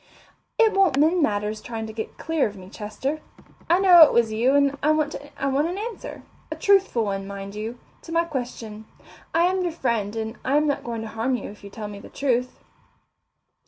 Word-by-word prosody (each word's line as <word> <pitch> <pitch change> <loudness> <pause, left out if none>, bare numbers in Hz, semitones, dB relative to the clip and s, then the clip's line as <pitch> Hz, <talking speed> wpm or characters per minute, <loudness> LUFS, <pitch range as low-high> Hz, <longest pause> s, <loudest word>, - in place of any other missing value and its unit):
"It 450 -2 +5
won't 385 -8 +3
mend 320 +5 +3
matters 210 -4 0
trying 225 -1 -5
to 220 - -8
get 220 0 -6
clear 320 -5 0
of 210 - -9
me, 185 0 -12
Chester. 230 +9 -4 0.5
I 345 - +5
know 365 -3 +7
it 310 - +9
was 235 -2 +2
you 245 +5 +2
and 280 -1 +3
I 300 - +2
want 310 -1 +2
an 285 +4 -2
answer 450 +2 -6 0.3
a - - -2
truthful 390 - +3
one, 195 -1 -3
mind 200 0 -7
you 220 +3 -5 0.2
to 330 - -11
my 335 0 +3
question. 240 -8 -6 0.5
I 330 - +3
am 370 +1 +2
your 350 -1 -1
friend, 230 -9 -1
and 225 +1 -4
I 275 +2 +2
am 300 - +3
not 285 -1 -1
going 230 -2 -4
to - - -6
harm 225 +4 -1
you 240 - -6
if 205 - -16
you 200 - -9
tell 210 +1 -7
me 205 -1 -8
the - - -12
truth." 250 -2 -1
255 Hz, 205 wpm, -24 LUFS, 220-315 Hz, 0.5 s, it